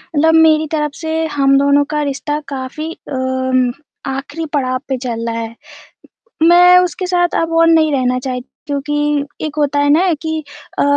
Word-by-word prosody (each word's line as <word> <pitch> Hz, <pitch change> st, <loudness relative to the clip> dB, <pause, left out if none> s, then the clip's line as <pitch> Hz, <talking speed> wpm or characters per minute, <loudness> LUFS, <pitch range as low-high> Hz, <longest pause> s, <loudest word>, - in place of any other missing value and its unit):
मतलब 320 Hz, +2 st, +3 dB
मेरी 315 Hz, -1 st, +4 dB
तरफ 300 Hz, -2 st, -1 dB
से 320 Hz, -1 st, -4 dB, 0.2 s
हम 275 Hz, 0 st, +4 dB
दोनों 280 Hz, +1 st, +3 dB
का 300 Hz, -, +1 dB
रिश्ता 295 Hz, +2 st, -3 dB
काफ़ी 275 Hz, +4 st, -5 dB, 0.2 s
अम, 260 Hz, -1 st, 0 dB, 0.4 s
आखिरी 280 Hz, +4 st, -4 dB
पड़ाव 255 Hz, -2 st, 0 dB
पे 265 Hz, -, -1 dB
चल 235 Hz, -2 st, -4 dB
रहा 230 Hz, 0 st, -3 dB
है, 225 Hz, 0 st, -6 dB, 0.9 s
मैं 355 Hz, +2 st, +7 dB
उसके 360 Hz, +1 st, -1 dB
साथ 350 Hz, -1 st, +1 dB
अब 330 Hz, -, -3 dB
और 330 Hz, -, +5 dB
नहीं 315 Hz, -2 st, +4 dB
रहना 255 Hz, -2 st, +1 dB
चाहती 255 Hz, +3 st, -7 dB
हूँ 280 Hz, -, -1 dB
कि, 295 Hz, -1 st, 0 dB, 0.2 s
एक 305 Hz, -1 st, -4 dB
होता 290 Hz, -1 st, +1 dB
है 285 Hz, 0 st, +2 dB
ना 350 Hz, +4 st, +3 dB
कि 315 Hz, 0 st, -2 dB, 0.4 s
अ, -, -, +3 dB
290 Hz, 175 wpm, -16 LUFS, 260-320 Hz, 0.9 s, मैं